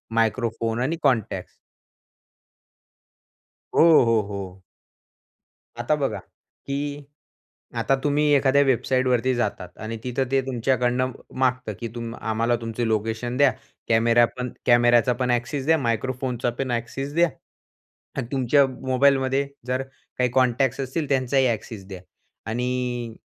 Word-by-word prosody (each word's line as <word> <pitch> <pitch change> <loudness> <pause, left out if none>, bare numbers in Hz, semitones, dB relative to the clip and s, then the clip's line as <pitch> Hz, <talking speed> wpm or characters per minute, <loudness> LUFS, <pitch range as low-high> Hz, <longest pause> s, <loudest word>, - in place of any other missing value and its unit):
Microphone 115 0 0
आणि 155 +6 -1
contacts. 125 -7 0 2.2
हो, 165 -5 +7
हो, 115 -2 +3
हो. 95 -2 -7 1.2
आता 135 +6 +1
बघा, 140 -2 -1 0.5
की 145 +1 -3 0.7
आता 135 - +2
तुम्ही 145 +1 +2
एखाद्या 140 +1 +4
वेबसाईटवरती 130 -1 +1
जातात 100 -6 -2
आणि 115 +1 -4
तिथं 125 +1 -1
ते 135 -1 +3
तुमच्याकडून 125 0 +1 0.4
मागतं, 125 -4 0
की 115 - -4 0.3
आम्हाला 115 +2 +1
तुमचं 115 +1 -3
लोकेशन 110 +3 -1
द्या, 140 -2 +5 0.4
कॅमेरा 115 +1 +4
पण 125 -1 -3
कॅमेराचा 120 0 +5
पण 125 0 -1
ॲक्सेस 120 +3 -1
द्या, 160 0 +4
मायक्रोफोनचा 125 0 -1
पण 130 -2 -1
ॲक्सेस 135 +4 -3
द्या 170 -1 +4 0.9
आणि 115 - -2
तुमच्या 135 +1 +3
मोबाईलमध्ये 135 +1 +1 0.2
जर 130 +1 0 0.4
काही 125 -1 +2
कॉन्टॅक्ट्स 130 +1 +2
असतील 140 +3 -3
त्यांचाही 130 0 +2
ॲक्सेस 110 -3 -4
द्या 95 -3 -8 0.5
आणि 125 -1 -2
125 Hz, 115 wpm, -24 LUFS, 115-135 Hz, 2.2 s, हो